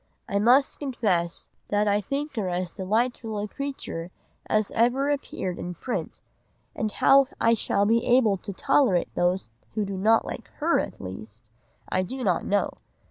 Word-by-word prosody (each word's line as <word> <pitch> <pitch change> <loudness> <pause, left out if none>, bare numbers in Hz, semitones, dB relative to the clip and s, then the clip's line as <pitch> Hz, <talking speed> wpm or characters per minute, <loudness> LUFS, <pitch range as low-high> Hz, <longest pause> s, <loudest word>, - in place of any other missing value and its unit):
I 200 -3 0
must 250 +6 +4
confess 205 - -1 0.2
that 205 0 +1
I 205 0 +2
think 275 +7 -3
her 205 -5 -1
as 180 -1 -2
delightful 220 +3 -1
a 205 +1 -2
creature 270 -10 -5 0.4
as 215 -1 +1
ever 255 +5 +2
appeared 190 -10 -3
in 180 0 -5
print, 250 +9 -4 0.5
and 215 -1 -1
how 275 +3 +5
I 230 - +4
shall 205 -2 +1
be 230 +2 +3
able 240 -5 +4
to 200 - -7
tolerate 195 -2 +2
those 175 -8 0 0.2
who 215 -2 0
do 195 -1 -4
not 225 +3 +4
like - - -6
her 330 +2 +2
at - - -4
least, 110 +4 -9 0.4
I 185 - +1
do 255 +7 -4
not 180 -6 +1
know. 205 0 0
210 Hz, 165 wpm, -26 LUFS, 185-250 Hz, 0.5 s, how